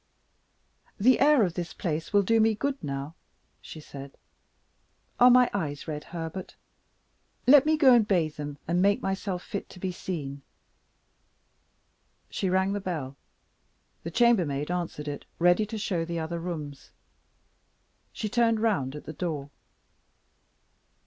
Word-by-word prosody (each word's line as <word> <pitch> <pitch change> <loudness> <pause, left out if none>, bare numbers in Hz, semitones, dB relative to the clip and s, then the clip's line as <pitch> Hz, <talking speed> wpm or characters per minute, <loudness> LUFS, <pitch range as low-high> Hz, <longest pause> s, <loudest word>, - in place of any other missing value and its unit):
"The 250 +5 +5
air 290 -3 +5
of 180 -4 0
this 175 -1 -5
place 160 -2 -3
will 205 -1 +4
do 225 +4 +3
me 220 0 +3
good 275 +4 -3
now," 140 +2 -4 0.5
she 160 - -10
said. 140 -2 -11 1.0
"Are 250 - +8
my 250 0 +6
eyes 150 -8 -3
red, 150 -1 -5
Herbert? 170 +2 -7 0.9
Let 285 +2 +7
me 310 0 +3
go 270 -4 +6
and 230 -3 +4
bathe 170 -6 +1
them, 145 -1 -6
and 175 +2 +1
make 200 +1 +2
myself 190 -1 -3
fit 200 -4 -6
to 180 - -13
be 185 0 -2
seen." 145 -6 -5 1.9
She 190 - -1
rang 190 +2 +1
the 205 - -2
bell. 155 -8 -4 0.9
The 165 - -5
chambermaid 170 - +2
answered 170 -4 -4
it, 145 -1 -5
ready 175 +5 +3
to 220 - -5
show 185 -5 -1
the 170 0 -4
other 165 +1 -3
rooms. 155 -5 -6 1.2
She 215 - -4
turned 230 0 +2
round 185 - 0
at 150 - -8
the 155 - -8
door. 150 -4 -4
180 Hz, 140 wpm, -27 LUFS, 155-215 Hz, 1.9 s, Are